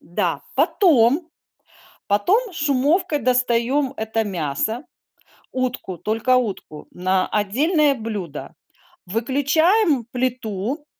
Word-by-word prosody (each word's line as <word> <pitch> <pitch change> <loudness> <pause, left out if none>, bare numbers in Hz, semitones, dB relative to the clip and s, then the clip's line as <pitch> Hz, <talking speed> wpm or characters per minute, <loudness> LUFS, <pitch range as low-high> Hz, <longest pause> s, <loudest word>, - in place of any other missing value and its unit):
Да, 170 +3 -2
потом, 310 - +3 0.8
потом 380 - +1
шумовкой 295 +3 +1
достаем 250 +2 +1
это 220 0 -1
мясо. 190 - -2 0.7
Утку, 250 -8 -3
только 225 +4 +1
утку 200 -10 -4
на 185 +1 0
отдельное 280 - +2
блюдо. 210 - -6 0.5
Выключаем 285 - +2
плиту 250 +2 -3
250 Hz, 80 wpm, -21 LUFS, 210-295 Hz, 0.8 s, потом